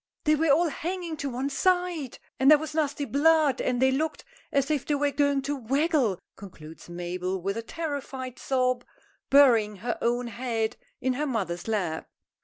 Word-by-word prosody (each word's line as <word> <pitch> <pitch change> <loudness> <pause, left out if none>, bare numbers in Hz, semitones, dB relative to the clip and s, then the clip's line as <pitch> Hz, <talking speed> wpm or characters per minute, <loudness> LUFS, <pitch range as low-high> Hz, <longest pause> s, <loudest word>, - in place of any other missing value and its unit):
They 305 - +4
were 310 +1 +2
all 325 +4 +4
hanging 345 +2 -4
to 280 -1 -3
one 260 +3 -3
side; 355 -5 0 0.2
and 265 +1 +5
there 305 - +9
was 310 0 -6
nasty 290 -2 -1
blood, 290 +1 +3
and 250 -1 0
they 265 +1 +4
looked 310 +4 -1 0.3
as 275 +1 +1
if 295 -4 0
they 295 - 0
was 285 0 +1
going 280 -1 +1
to 290 +1 -2
waggle," 270 - +1 0.2
concludes 165 -5 -12
Mabel, 180 +2 -3
with 195 +3 -2
a 230 - -3
terrified 270 -3 -5
sob, 255 -2 0 0.5
burying 235 -7 +5
her 235 +5 -4
own 240 +1 +1
head 230 -2 -2 0.3
in 260 0 +1
her 295 +4 -2
mother's 190 -9 -3
lap. 185 -8 -2
270 Hz, 175 wpm, -27 LUFS, 225-295 Hz, 0.5 s, there